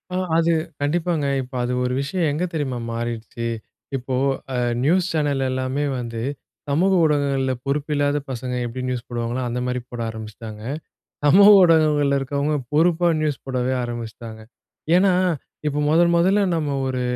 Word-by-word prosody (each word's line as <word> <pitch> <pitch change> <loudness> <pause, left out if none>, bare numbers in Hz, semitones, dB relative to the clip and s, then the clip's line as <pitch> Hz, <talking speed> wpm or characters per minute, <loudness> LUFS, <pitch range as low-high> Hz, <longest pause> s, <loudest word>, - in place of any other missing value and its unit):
ஆ - - 0 0.2
அது 165 0 +3 0.3
கண்டிப்பாங்க. 160 +1 0 0.2
இப்ப 130 +1 -10
அது 125 +1 -1
ஒரு 125 0 -1
விஷயம் 160 +4 -1
எங்க 150 +5 -2
தெரியுமா 140 -6 -2
மாறிருச்சு? 115 0 -4 0.5
இப்போ 130 0 -3 0.4
அ - - 0 0.2
நியூஸ் 175 +5 +3
சேனல் 145 -3 0
எல்லாமே 130 +3 -1
வந்து, 115 -2 -5 0.5
சமூக 170 +7 +2
ஊடகங்கள்ல 140 -3 +1
பொறுப்பில்லாத 145 0 0
பசங்க 125 0 -4
எப்படி 120 +2 -5
நியூஸ் 125 -2 -3
போடுவாங்களோ, 120 +1 -2
அந்த 120 +1 -2
மாரி 125 0 -1
போட 120 -1 -5
ஆரம்பிச்சுட்டாங்க. 110 -1 -8 0.6
சமூக 190 +8 +7
ஊடகங்கள்ல 150 -4 +4
இருக்கவங்க 140 +2 -1 0.2
பொறுப்பா 170 +3 +3
நியூஸ் 150 -2 -1
போடவே 130 -1 -1
ஆரம்பிச்சுட்டாங்க. 115 -1 -6 0.6
ஏன்னா, 190 +1 +4 0.5
இப்ப 145 0 -1
மொதன் 170 +2 +4
மொதல்ல 195 +4 +3
நம்ம 145 -3 -1
ஒரு 130 -1 -2
140 Hz, 140 wpm, -22 LUFS, 125-155 Hz, 0.6 s, சமூக